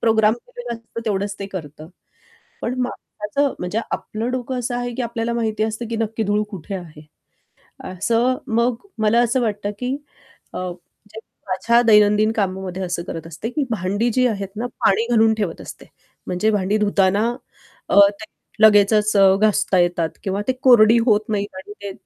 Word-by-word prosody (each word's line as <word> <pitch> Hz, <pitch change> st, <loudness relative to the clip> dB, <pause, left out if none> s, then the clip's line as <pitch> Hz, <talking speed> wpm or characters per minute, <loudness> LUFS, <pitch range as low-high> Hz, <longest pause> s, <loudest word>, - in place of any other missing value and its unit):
Programme 220 Hz, -1 st, +3 dB
केलेला 485 Hz, -, -8 dB
असतो. 230 Hz, 0 st, -9 dB
तेवढंच 200 Hz, -1 st, -1 dB
ते 195 Hz, -, -4 dB
करतं. 155 Hz, -4 st, -8 dB, 0.7 s
पण 245 Hz, -, -2 dB
माणसाचं 250 Hz, +3 st, -3 dB
म्हणजे 180 Hz, +5 st, -2 dB
आपलं 225 Hz, +3 st, -3 dB
डोकं 255 Hz, 0 st, -3 dB
असं 245 Hz, 0 st, -3 dB
आहे, 245 Hz, -1 st, -3 dB
की 260 Hz, -, -3 dB
आपल्याला 235 Hz, 0 st, -2 dB
माहिती 220 Hz, -2 st, -1 dB
असतं, 220 Hz, +2 st, -2 dB
की 230 Hz, -, -2 dB
नक्की 225 Hz, 0 st, -2 dB
धूळ 205 Hz, +1 st, +1 dB
कुठे 195 Hz, 0 st, -7 dB
आहे, 165 Hz, -5 st, -8 dB, 0.9 s
असं 230 Hz, +7 st, +1 dB
मग 235 Hz, +1 st, +1 dB, 0.3 s
मला 215 Hz, +2 st, +3 dB
असं 245 Hz, +2 st, +1 dB
वाटतं, 205 Hz, -3 st, -2 dB
की 255 Hz, +2 st, -2 dB, 0.6 s
अ, -, -, -5 dB
म्हणजे 185 Hz, +4 st, -9 dB, 0.3 s
माझ्या 235 Hz, +6 st, +2 dB
दैनंदिन 210 Hz, -1 st, +5 dB
कामामध्ये 190 Hz, -2 st, -2 dB
असं 175 Hz, -1 st, -3 dB
करत 165 Hz, -1 st, -7 dB
असते, 165 Hz, +7 st, -6 dB
की 290 Hz, +4 st, -1 dB
भांडी 205 Hz, +2 st, 0 dB
जी 255 Hz, +1 st, +3 dB
आहेत 200 Hz, -4 st, -3 dB
ना 240 Hz, -, -2 dB, 0.2 s
पाणी 220 Hz, +4 st, +3 dB
घालून 225 Hz, -1 st, +4 dB
ठेवत 200 Hz, -6 st, -3 dB
असते, -, -, -10 dB, 0.4 s
म्हणजे 185 Hz, +4 st, +1 dB
भांडी 205 Hz, 0 st, +1 dB
धुताना 205 Hz, 0 st, +2 dB, 0.6 s
अ, -, -, +5 dB, 0.2 s
ते 220 Hz, -, -7 dB, 0.4 s
लगेचच 210 Hz, 0 st, +4 dB
अ, 195 Hz, -1 st, +6 dB
घासता 205 Hz, -3 st, +2 dB
येतात 175 Hz, -2 st, +1 dB
किंवा 195 Hz, +1 st, -2 dB
ते 260 Hz, -, +2 dB
कोरडी 235 Hz, -3 st, +7 dB
होत 215 Hz, -3 st, +4 dB
नाहीत 205 Hz, -2 st, -2 dB
आणि 190 Hz, +2 st, -9 dB
ते 200 Hz, -, -4 dB
215 Hz, 165 wpm, -21 LUFS, 195-230 Hz, 0.9 s, कोरडी